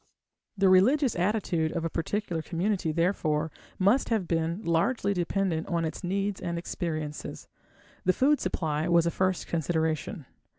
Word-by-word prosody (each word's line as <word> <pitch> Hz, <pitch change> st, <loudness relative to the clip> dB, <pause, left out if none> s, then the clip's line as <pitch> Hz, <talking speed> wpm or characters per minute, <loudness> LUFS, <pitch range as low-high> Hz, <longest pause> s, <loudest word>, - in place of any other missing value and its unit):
The 195 Hz, 0 st, +4 dB
religious 235 Hz, +9 st, +4 dB
attitude 175 Hz, -4 st, 0 dB
of 165 Hz, -1 st, -2 dB
a -, -, 0 dB
particular 175 Hz, 0 st, -2 dB
community, 180 Hz, +1 st, -1 dB
therefore, 160 Hz, -2 st, 0 dB, 0.3 s
must 205 Hz, +8 st, +3 dB
have 215 Hz, -6 st, 0 dB
been 165 Hz, +4 st, -1 dB
largely 200 Hz, +5 st, +1 dB
dependent 175 Hz, -2 st, -1 dB
on 170 Hz, -1 st, 0 dB
its 160 Hz, -, -5 dB
needs 195 Hz, +2 st, -1 dB
and 170 Hz, 0 st, -3 dB
experiences. 155 Hz, -3 st, -4 dB, 0.6 s
The 185 Hz, -, +3 dB
food 285 Hz, +6 st, +3 dB
supply 155 Hz, -1 st, -1 dB
was 170 Hz, -1 st, +4 dB
a 170 Hz, -, +1 dB
first 185 Hz, 0 st, 0 dB
consideration. 160 Hz, -, -1 dB
175 Hz, 140 wpm, -28 LUFS, 160-195 Hz, 0.6 s, The